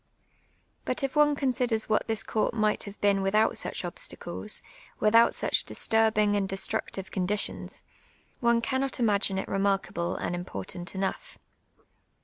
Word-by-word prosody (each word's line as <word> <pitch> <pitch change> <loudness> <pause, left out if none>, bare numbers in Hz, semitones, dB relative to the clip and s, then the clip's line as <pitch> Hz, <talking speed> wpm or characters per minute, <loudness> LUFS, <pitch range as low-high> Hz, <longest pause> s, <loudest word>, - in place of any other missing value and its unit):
But 305 - -1
if 270 +1 -1
one 295 -1 +5
considers 250 -5 0
what 215 - +1
this 225 -2 0
court 220 +1 0
might 215 -1 +1
have 200 0 -9
been 200 -1 +3
with 195 +2 0
)ut 215 +1 +4
such - - -3
obstacles, - - -4 0.4
without 230 +2 +5
such - - +1
disturbing 215 -2 +2
and 195 -1 0
destructive 195 0 -2
conditions, 200 +2 -2 0.6
one 235 -1 +3
cannot 260 +2 -1
imagine 205 -4 +2
it 190 - -2
remarkable 195 -3 0
and - - -3
important 175 - -6
enough. 195 - -3
215 Hz, 135 wpm, -28 LUFS, 195-235 Hz, 0.6 s, one